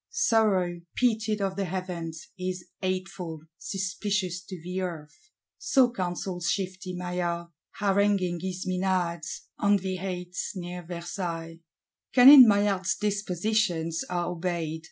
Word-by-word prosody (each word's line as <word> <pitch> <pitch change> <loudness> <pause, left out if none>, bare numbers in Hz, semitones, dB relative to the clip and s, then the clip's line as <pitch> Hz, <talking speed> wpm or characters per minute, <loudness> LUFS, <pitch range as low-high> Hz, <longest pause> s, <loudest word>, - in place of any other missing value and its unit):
Sorrow, 210 - +2
pitied 220 -3 +1
of 195 -1 -1
the 200 0 -1
Heavens, 175 -3 -5
is 185 -1 -4 0.2
hateful, 185 -3 -3 0.2
suspicious 190 -1 -2
to 185 -2 -8
the 180 +3 -4
Earth.—So 180 - -1
counsels 180 -3 -3
shifty 190 -1 -3
Maillard; 175 -1 -2 0.3
haranguing 195 -3 +2
his 185 +1 -4
Menads, 180 -3 -1 0.2
on 205 0 +4
the 190 -1 -3
heights 180 -1 -4
near 180 -1 -5
Versailles. 170 -1 -5 0.6
Cunning 260 0 +11
Maillard's 200 -2 +2
dispositions 195 -4 0
are 175 -1 -1
obeyed. 170 -2 -2
185 Hz, 110 wpm, -27 LUFS, 175-200 Hz, 0.6 s, Cunning